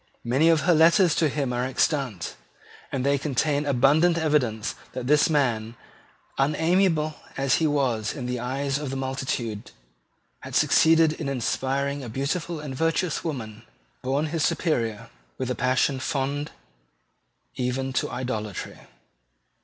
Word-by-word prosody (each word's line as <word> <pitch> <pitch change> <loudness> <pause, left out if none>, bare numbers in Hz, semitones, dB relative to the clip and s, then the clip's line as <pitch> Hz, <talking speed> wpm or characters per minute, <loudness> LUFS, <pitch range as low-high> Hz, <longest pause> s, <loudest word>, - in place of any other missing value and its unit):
Many 135 +7 +3
of 160 -2 +4
her 175 - +3
letters 165 +2 +5
to 160 -2 +2
him 135 -3 -2
are 120 0 -1
extant; 130 - -1 0.6
and 130 -1 -2
they 140 0 +2
contain 145 +1 0
abundant 145 +6 +4
evidence 130 -9 0 0.2
that 130 - -5
this 150 +4 +4
man, 120 -7 0 0.6
unamiable 160 +2 +2 0.2
as 135 -1 +2
he 160 - +3
was 125 -7 0
in 130 - -5
the 125 0 -2
eyes 135 +3 -2
of 150 -2 -4
the 135 - -4
multitude, 130 -5 -3 0.7
had - - -8
succeeded 160 0 +5
in 155 -3 -4
inspiring 135 +2 -1
a 120 - -6
beautiful 155 +7 -2
and 150 -3 -6
virtuous 165 +4 0
woman, 115 -10 -5 0.4
born 140 +4 0
his 160 0 -1
superior, 115 - -1 0.3
with 130 -1 -2
a - - -1
passion 130 +2 +1
fond 140 +2 -2 1.1
even 130 +1 -2
to - - 0
idolatry. 110 -6 -4
135 Hz, 140 wpm, -25 LUFS, 125-155 Hz, 1.1 s, letters